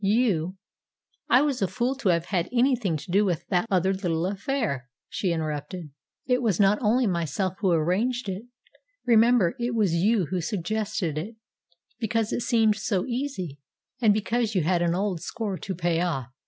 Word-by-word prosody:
You 195 -5 +1 0.3
" - - -47
"I 255 +3 +6
was 280 -6 -1
a 195 - +2
fool 240 +8 -1
to 230 -8 0
have 170 -1 +2
had 180 -3 -1
anything 245 - +2
to 150 +4 -9
do 200 +3 +4
with 175 -4 -1
that 180 +2 +1
other 190 -1 +2
little 175 -3 -1
affair," 195 - -2 0.2
she 185 - -1
interrupted. 155 +1 -4 0.3
"It 250 -1 +2
was 215 -8 +1
not 200 +1 +4
only 240 +3 +3
myself 180 0 -1
who 195 - +1
arranged 195 +10 +1
it. 195 +4 -4 0.6
Remember, 230 -5 +4
it 240 0 -1
was 205 -7 +2
you 195 +3 +2
who 185 -2 0
suggested 195 -2 -2
it, 215 +8 -7 0.6
because 225 -1 0
it - - -1
seemed 225 -3 +3
so 205 -3 -1
easy, 235 - -4 0.4
and 220 -3 +5
because 215 +1 0
you 180 - +2
had 175 +2 +2
an 170 0 +1
old 190 -3 -1
score 210 -2 -4
to 190 - -4
pay 170 -1 0
off." 135 -8 -2
195 Hz, 180 wpm, -26 LUFS, 175-230 Hz, 0.6 s, I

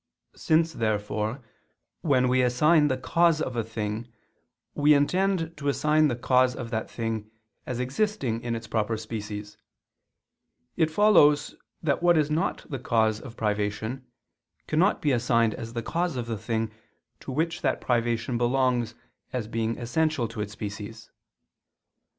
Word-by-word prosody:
Since, 160 +1 +2
therefore, 110 +2 -2 0.6
when 130 -5 +3
we 130 +1 +3
assign 150 +5 +4
the 130 -2 0
cause 165 +4 +2
of 130 -5 -3
a 115 - 0
thing, 110 +1 -4 0.6
we 150 +1 +5
intend 170 +2 +1
to 140 -1 -4
assign 150 +2 +3
the 125 - -1
cause 125 +1 +2
of 120 -2 -6
that 110 -1 -2
thing 110 -2 -4 0.4
as 125 -1 -3
existing 130 - -1
in 120 -1 -2
its 115 0 -6
proper 110 0 -1
species, 105 -1 -6 1.2
it 160 -2 +2
follows 160 -5 +4 0.3
that 145 -1 +1
what 175 -1 +5
is 150 -1 +1
not 165 +5 -1
the 135 -4 -5
cause 110 -3 +1
of 120 -3 -11
privation, 105 +4 -2 0.6
cannot 175 +7 +2
be 145 - +3
assigned 115 -2 +2
as 115 0 -7
the 115 -1 -3
cause 170 +3 -1
of 125 -2 -3
the 115 -1 -3
thing 110 +1 -2 0.5
to - - -7
which 160 +4 -1
that - - 0
privation 120 0 0
belongs 120 -2 +1 0.4
as 120 -4 -3
being 115 0 -2
essential 130 +1 0
to 115 -2 -5
its 105 0 -5
species. 105 +2 -7
120 Hz, 150 wpm, -26 LUFS, 110-150 Hz, 1.2 s, we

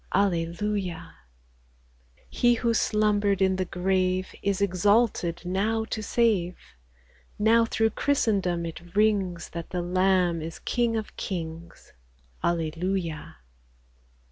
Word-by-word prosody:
Alleluia! 180 -1 -1 1.0
3i - - -30
He 240 0 +3
who 235 0 0
slumbered 210 -3 +2
in 190 -1 +2
the 185 - -1
grave 185 +1 0
Is 200 -1 0
exalted 200 -1 +2
now 215 +5 0
to 215 - -2
save; 205 -6 +1 0.8
Now 225 +2 +4
through 225 0 +1
Christendom 195 -11 0
it 170 +2 -9
rings, 200 -5 +1
That 170 -1 -7
the 180 -1 -2
Lamb 180 -1 +2
is 160 +1 -6
King 235 -2 0
of 220 -1 -4
kings. 165 -2 -6 0.5
Alleluia 170 0 -2
190 Hz, 110 wpm, -26 LUFS, 175-210 Hz, 1.0 s, Now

